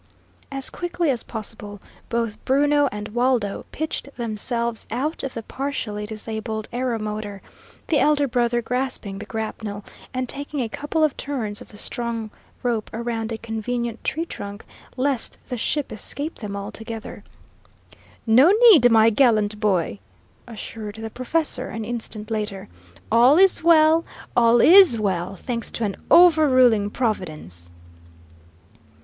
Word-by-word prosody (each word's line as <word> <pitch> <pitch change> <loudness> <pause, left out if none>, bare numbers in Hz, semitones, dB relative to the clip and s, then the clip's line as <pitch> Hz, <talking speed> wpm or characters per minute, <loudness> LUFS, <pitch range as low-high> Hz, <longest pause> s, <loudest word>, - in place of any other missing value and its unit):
As 270 -1 -3
quickly 350 -3 -1
as 240 -3 -1
possible, 210 -2 -6 0.3
both 230 -2 -2
Bruno 290 +1 +3
and 210 +1 -6
Waldo 240 -3 0
pitched 315 -2 -4
themselves 235 0 -3
out 275 +8 -2
of 270 - -5
the 230 - -5
partially 215 -6 -4
disabled 220 0 -5
aeromotor, 215 -5 -3 0.5
the 300 - +2
elder 295 -1 +3
brother 240 -1 +1
grasping 250 -6 -3
the 210 - -8
grapnel 215 -2 -5 0.3
and 255 -1 -3
taking 285 +3 -3
a 240 - 0
couple 295 +6 -1
of 305 -3 +2
turns 230 -6 -3
of - - -11
the 205 - -13
strong 230 -1 -4 0.3
rope 235 -4 -1
around 225 -1 -3
a 225 - -3
convenient 230 +1 -4
tree 330 +2 -1
trunk, 205 -9 -8 0.3
lest 260 -2 0
the 250 - -2
ship 285 +5 -2
escape 285 +8 -5
them 205 -3 -5
altogether. 220 +2 -7 1.0
"No 250 +9 +6 0.2
need, 245 - +7
my 225 0 +5
gallant 215 -4 +2
boy!" 195 -3 0 0.5
assured 220 -2 -7
the 220 0 -7
professor, 305 +7 -1
an 225 -1 -5
instant 225 -2 -5
later. 210 -3 -3 0.4
"All 245 +6 +6
is 380 -3 +4
well, 325 0 +5 0.3
all 235 0 +5
IS 350 - +8
well, 190 -2 -1
thanks 235 +4 -4
to 235 - -4
an 200 -3 -1
over 320 -4 +7
ruling 240 -6 +4
Providence!" 155 - -4
230 Hz, 135 wpm, -23 LUFS, 215-270 Hz, 1.0 s, IS